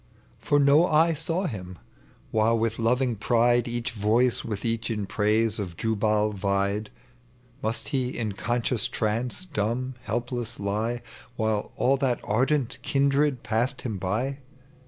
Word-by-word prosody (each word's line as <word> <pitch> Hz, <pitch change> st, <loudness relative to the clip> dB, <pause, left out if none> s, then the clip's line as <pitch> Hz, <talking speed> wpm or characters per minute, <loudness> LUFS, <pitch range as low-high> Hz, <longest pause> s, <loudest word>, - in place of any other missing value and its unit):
For 145 Hz, -, +2 dB
no 145 Hz, +5 st, +5 dB
eye 160 Hz, +1 st, +4 dB
saw 165 Hz, +4 st, -1 dB
him, 95 Hz, -, -5 dB, 0.5 s
while 110 Hz, +1 st, +3 dB
with 115 Hz, 0 st, -1 dB
loving 125 Hz, +1 st, +2 dB
pride 120 Hz, +3 st, +2 dB
Each 120 Hz, +1 st, -3 dB
voice 115 Hz, +3 st, +2 dB
with 105 Hz, -2 st, -4 dB
each 115 Hz, 0 st, -1 dB
in 105 Hz, -3 st, -2 dB
praise 110 Hz, +2 st, +1 dB
of 90 Hz, -5 st, -5 dB
Jubal 105 Hz, -1 st, +1 dB
vied. 100 Hz, +1 st, 0 dB, 0.7 s
Must 110 Hz, +1 st, -2 dB
he 130 Hz, -3 st, -1 dB
in 110 Hz, -3 st, -1 dB
conscious 120 Hz, +2 st, 0 dB
trance, 115 Hz, +10 st, -2 dB
dumb, 130 Hz, -, -2 dB
helpless 120 Hz, 0 st, -3 dB
lie 110 Hz, +4 st, -1 dB, 0.3 s
While 110 Hz, -2 st, -1 dB
all 135 Hz, +2 st, +3 dB
that 130 Hz, -3 st, 0 dB
ardent 125 Hz, +3 st, +1 dB
kindred 140 Hz, -1 st, +1 dB
passed 120 Hz, +4 st, 0 dB
him 110 Hz, -6 st, -3 dB
by? 120 Hz, +10 st, -1 dB
115 Hz, 135 wpm, -26 LUFS, 105-130 Hz, 0.7 s, no